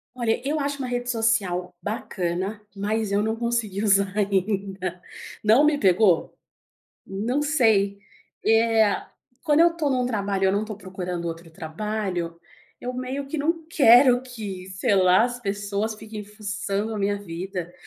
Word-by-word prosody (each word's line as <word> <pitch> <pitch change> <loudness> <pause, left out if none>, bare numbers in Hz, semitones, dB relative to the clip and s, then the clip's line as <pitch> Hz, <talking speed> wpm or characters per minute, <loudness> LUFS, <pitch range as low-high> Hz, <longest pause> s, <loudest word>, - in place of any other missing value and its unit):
Olha, 235 -3 0
eu 305 +1 0
acho 280 0 -2
uma 260 - -3
rede 245 0 -2
social 195 -6 0
bacana, 190 0 -3
mas 210 +1 -1
eu 205 +1 +2
não 220 0 0
consegui 230 -4 -1
usar 200 -2 +3
ainda. 195 -2 -1 0.4
Não, 220 +7 +5
me 300 -1 +3
pegou. 190 - +3 0.7
Não 230 +9 -2
sei. 220 -10 +2 0.5
É, 225 -1 +3 0.4
quando 295 0 +3
eu 335 0 +5
tô 305 -4 0
num 250 -2 +1
trabalho 200 -4 -1
eu 190 - +3
não 205 +2 0
tô 215 -1 -7
procurando 180 -3 -5
outro 165 0 -6
trabalho, 175 +1 -4 0.4
eu 250 - -4
meio 260 +2 -4
que 295 +3 -4
não 325 +2 -1
quero 250 -4 +6
que, 210 -7 -7
sei 190 +2 +1
lá, 185 +3 +5
as 245 0 -4
pessoas 205 +1 -2
fiquem 215 -1 -8
fuçando 205 0 -3
a - - -3
minha 205 0 0
vida. 180 -1 -6
210 Hz, 150 wpm, -24 LUFS, 190-240 Hz, 0.7 s, quero